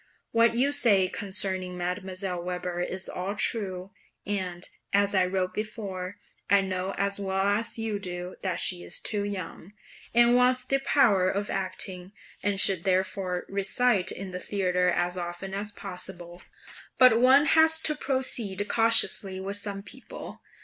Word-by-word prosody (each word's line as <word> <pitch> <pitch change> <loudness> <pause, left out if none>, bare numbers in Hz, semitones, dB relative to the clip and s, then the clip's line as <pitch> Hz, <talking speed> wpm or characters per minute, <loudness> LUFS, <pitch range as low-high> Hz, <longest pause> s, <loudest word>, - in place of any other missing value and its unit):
What 230 0 +3
you 270 +4 +2
say 210 -10 +4
concerning 190 -1 +1
Mdlle. 180 0 -4
Weber 180 0 -4
is 185 +1 -3
all 190 +3 -4
true; 195 -4 -1 0.3
and, 185 -3 -3 0.2
as 200 0 +2
I 190 -2 +3
wrote 185 0 -2
before, 205 -3 -5 0.3
I 200 0 +5
know 190 0 -3
as 200 0 -1
well 195 -1 -1
as 205 +4 +1
you 220 -2 -3
do 180 -1 -6
that 185 -3 -2
she 180 -1 +1
is - - -3
too 205 -2 -1
young, 195 -1 -6 0.4
and 240 +1 +5
wants 250 0 +3
the 275 - +1
power 220 -10 +3
of 200 +2 -2
acting, 185 0 -4 0.3
and 200 -1 -1
should 190 -3 +5
therefore 185 -1 -1
recite 200 +1 +1
in 190 0 -7
the 180 - -5
theatre 180 -2 0
as 175 +1 -1
often 175 +2 -6
as 205 +1 -4
possible; 180 -3 -8 0.6
but 250 -3 +6
one 265 +4 +6
has 320 +1 +5
to 305 - +1
proceed 240 -8 -1
cautiously 225 -4 +3
with 195 +2 -2
some 200 -1 -5
people. 260 +5 -11
195 Hz, 150 wpm, -27 LUFS, 185-215 Hz, 0.6 s, but